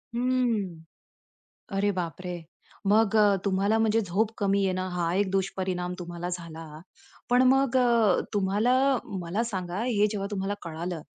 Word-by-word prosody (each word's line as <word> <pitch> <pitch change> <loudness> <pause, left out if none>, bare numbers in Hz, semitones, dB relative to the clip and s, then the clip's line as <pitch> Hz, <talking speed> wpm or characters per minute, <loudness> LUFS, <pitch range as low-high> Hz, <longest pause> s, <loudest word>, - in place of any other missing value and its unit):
हं, 235 -9 0 0.9
अरे 205 +1 +2
बापरे! 180 0 -4 0.5
मग 215 +1 +3
अ, 205 -2 +5
तुम्हाला 200 +3 +2
म्हणजे 225 0 +3
झोप 205 +2 0
कमी 200 -1 +2
येणं 185 -1 +1
ना 185 - -3
हा 170 -1 0
एक 200 0 +1
दुष्परिणाम 185 -2 -2
तुम्हाला 175 0 -5
झाला. 170 -2 -6 0.6
पण 245 +1 +5
मग 270 -1 +2
अ, 235 -6 +4
तुम्हाला 205 +4 +2 0.5
मला 180 +7 -2
सांगा, 190 -2 -3
हे 210 -4 +2
जेव्हा 200 -2 -3
तुम्हाला 200 0 -2
कळालं, 170 +1 -5
195 Hz, 140 wpm, -27 LUFS, 180-220 Hz, 0.9 s, अ